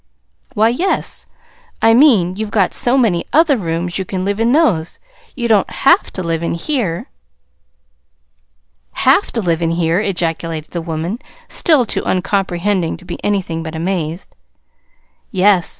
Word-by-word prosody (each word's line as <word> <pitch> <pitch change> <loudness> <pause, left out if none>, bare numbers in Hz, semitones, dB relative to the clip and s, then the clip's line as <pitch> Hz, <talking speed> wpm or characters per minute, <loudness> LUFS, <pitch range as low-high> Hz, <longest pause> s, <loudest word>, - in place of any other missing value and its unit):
"Why, 220 +1 +4
yes. 355 +11 -1 0.5
I 225 0 +5
mean, 225 - +5
you've 215 +1 -4
got 200 -3 +1
so 245 +2 +2
many 210 -10 +2
other 315 -2 +4
rooms 175 -3 -3
you - - -1
can 185 0 -4
live 200 +1 -1
in 230 +1 +2
those. 225 - +2 0.4
You 240 -3 -2
don't 215 -4 +3
HAVE 305 +9 +2
to 185 - -4
live 165 -1 -1
in 170 - -2
here." 190 - -3 1.8
"'Have 270 +10 +3
to 230 - -1
live 170 -2 0
in 165 - +1
here'!" 165 +1 +1
ejaculated 165 -5 -3
the 170 - -3
woman, 165 +6 -4 0.3
still 305 -8 +3
too - - -1
uncomprehending 185 -1 -1
to 180 - -14
be 175 - -7
anything 185 -5 -1
but 160 0 -6
amazed. 170 0 -3 0.9
"Yes. 190 -2 +3
190 Hz, 150 wpm, -17 LUFS, 170-225 Hz, 1.8 s, I